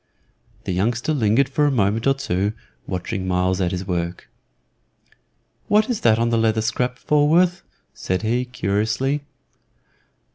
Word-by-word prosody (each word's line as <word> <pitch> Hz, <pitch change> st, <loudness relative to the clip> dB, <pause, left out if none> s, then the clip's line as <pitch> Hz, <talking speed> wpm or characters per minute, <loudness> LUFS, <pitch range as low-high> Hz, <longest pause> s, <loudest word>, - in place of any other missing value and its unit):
The -, -, -3 dB
youngster 120 Hz, -, 0 dB
lingered 125 Hz, 0 st, +2 dB
for 145 Hz, +2 st, +1 dB
a -, -, +2 dB
moment 110 Hz, -1 st, +1 dB
or 135 Hz, -, +4 dB
two 100 Hz, -5 st, -1 dB, 0.3 s
watching 95 Hz, +1 st, -3 dB
Myles 90 Hz, +1 st, +1 dB
at 90 Hz, -, +1 dB
his 90 Hz, +1 st, -4 dB
work. 85 Hz, -1 st, -3 dB, 1.4 s
"What 215 Hz, +3 st, +3 dB
is 235 Hz, -, -3 dB
that 110 Hz, -2 st, +4 dB
on 115 Hz, 0 st, +1 dB
the 115 Hz, -, +2 dB
leather 110 Hz, -1 st, +1 dB
scrap, 125 Hz, +2 st, -1 dB
Falworth?" 170 Hz, +5 st, +2 dB, 0.3 s
said 95 Hz, +3 st, -3 dB
he, 120 Hz, +3 st, 0 dB
curiously. 110 Hz, +5 st, -1 dB
115 Hz, 140 wpm, -22 LUFS, 95-135 Hz, 1.4 s, or